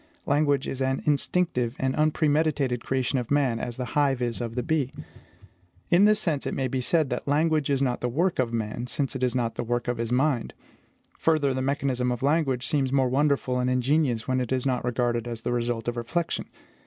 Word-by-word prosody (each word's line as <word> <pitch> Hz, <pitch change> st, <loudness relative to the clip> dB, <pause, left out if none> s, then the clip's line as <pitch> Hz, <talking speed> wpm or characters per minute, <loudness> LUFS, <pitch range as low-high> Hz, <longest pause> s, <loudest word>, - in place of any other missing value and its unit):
Language 145 Hz, -2 st, +2 dB
is 135 Hz, -, -4 dB
an 130 Hz, 0 st, 0 dB
instinctive 140 Hz, -4 st, +1 dB
and 130 Hz, 0 st, -1 dB
unpremeditated 150 Hz, -4 st, +1 dB
creation 130 Hz, 0 st, 0 dB
of 120 Hz, -, -5 dB
man, 135 Hz, -5 st, +2 dB
as 120 Hz, 0 st, -5 dB
the 125 Hz, -, -3 dB
hive 140 Hz, -3 st, +2 dB
is 120 Hz, -1 st, -2 dB
of 115 Hz, -1 st, -4 dB
the 125 Hz, -, -1 dB
bee. 155 Hz, -5 st, 0 dB, 1.0 s
In 180 Hz, +4 st, +6 dB
this 210 Hz, 0 st, +4 dB
sense, 155 Hz, -9 st, -1 dB
it -, -, -2 dB
may 135 Hz, -, 0 dB
be 130 Hz, +1 st, -2 dB
said 150 Hz, +2 st, +1 dB
that 125 Hz, -, -3 dB
language 155 Hz, 0 st, +2 dB
is 140 Hz, -1 st, +2 dB
not 125 Hz, -2 st, -1 dB
the 125 Hz, -, 0 dB
work 170 Hz, +7 st, 0 dB
of 125 Hz, -3 st, +1 dB
man, 115 Hz, +1 st, -3 dB
since 135 Hz, +3 st, -1 dB
it 130 Hz, -, -4 dB
is 125 Hz, 0 st, +1 dB
not 120 Hz, -2 st, 0 dB
the -, -, -1 dB
work 120 Hz, +1 st, -2 dB
of 120 Hz, -1 st, -1 dB
his 115 Hz, 0 st, -2 dB
mind. 130 Hz, -1 st, +1 dB, 0.6 s
Further, 155 Hz, -4 st, +2 dB
the 130 Hz, -, -2 dB
mechanism 130 Hz, -2 st, 0 dB
of 125 Hz, +1 st, -3 dB
language 140 Hz, -4 st, +1 dB
seems 135 Hz, -1 st, 0 dB
more 135 Hz, -2 st, +2 dB
wonderful 135 Hz, -2 st, +1 dB
and 125 Hz, 0 st, +1 dB
ingenious 125 Hz, -2 st, +1 dB
when 130 Hz, 0 st, +1 dB
it 125 Hz, -, -4 dB
is 130 Hz, 0 st, 0 dB
not 130 Hz, -2 st, 0 dB
regarded 120 Hz, -1 st, -1 dB
as 115 Hz, -1 st, -5 dB
the 120 Hz, -, -2 dB
result 120 Hz, -1 st, -2 dB
of 120 Hz, -, -1 dB
reflection. 160 Hz, +9 st, -2 dB
130 Hz, 215 wpm, -26 LUFS, 120-145 Hz, 1.0 s, In